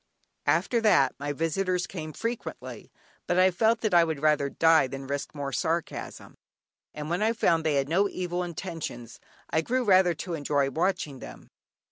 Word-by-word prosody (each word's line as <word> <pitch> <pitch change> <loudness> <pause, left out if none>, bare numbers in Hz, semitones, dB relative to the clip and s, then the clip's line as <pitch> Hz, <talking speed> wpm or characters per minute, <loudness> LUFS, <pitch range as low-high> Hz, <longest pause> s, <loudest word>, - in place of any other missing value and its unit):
After 175 +10 +2
that 175 -12 +4
my 145 +1 -3
visitors 180 +4 -1
came 155 -4 -7
frequently, 230 +8 -6 0.4
but 175 - +1
I 185 +1 +5
felt 220 +5 +2
that 215 -4 0
I 170 -1 +7
would 160 -3 -2
rather 150 -2 +2
die 160 -1 +4
than 135 +1 -7
risk 140 +2 -4
more 140 -2 -4
sarcasm, 165 +6 -3 0.6
and 150 0 -7
when 175 +5 -1
I 220 +2 +2
found 165 -7 +2
they 155 -2 +1
had 140 -1 +1
no 190 +6 +2
evil 180 -1 -3
intentions 165 - -6 0.3
I 160 - +2
grew 255 +8 0
rather 185 -5 +4
to 175 +3 -5
enjoy 145 -3 0
watching 160 -4 -1
them. - - -11
165 Hz, 170 wpm, -27 LUFS, 145-185 Hz, 0.6 s, I